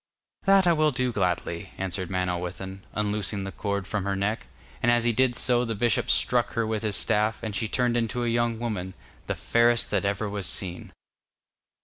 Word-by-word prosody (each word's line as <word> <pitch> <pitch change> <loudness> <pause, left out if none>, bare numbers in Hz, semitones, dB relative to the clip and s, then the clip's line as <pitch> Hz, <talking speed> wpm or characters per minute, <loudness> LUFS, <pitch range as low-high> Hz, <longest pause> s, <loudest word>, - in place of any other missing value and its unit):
'That 195 -1 +6
I 175 - +5
will 155 -1 +3
gladly,' 95 -10 -1
answered 95 -1 -3
Manawyddan, 90 +1 -3
unloosing 105 -1 -1
the 95 - -5
cord 100 -1 -2
from 105 0 -2
her 100 0 -1
neck, 100 +3 -2 0.3
and 120 - +4
as 120 -1 +3
he 120 - +3
did 125 +1 +2
so 120 0 +2
the 115 -2 -2
bishop 120 +2 +1
struck - - +2
her 115 -1 0
with 110 -1 -2
his 105 -2 -1
staff, 105 +1 +1
and 110 -3 -3
she 110 - -1
turned 120 +1 +1
into 120 +1 0
a - - 0
young 120 0 +1
woman, 100 -6 -4 0.3
the - - -1
fairest 120 0 +2
that 100 -2 +1
ever 100 +2 -1
was 100 -3 -2
seen. 90 0 -3
105 Hz, 190 wpm, -26 LUFS, 95-120 Hz, 0.3 s, That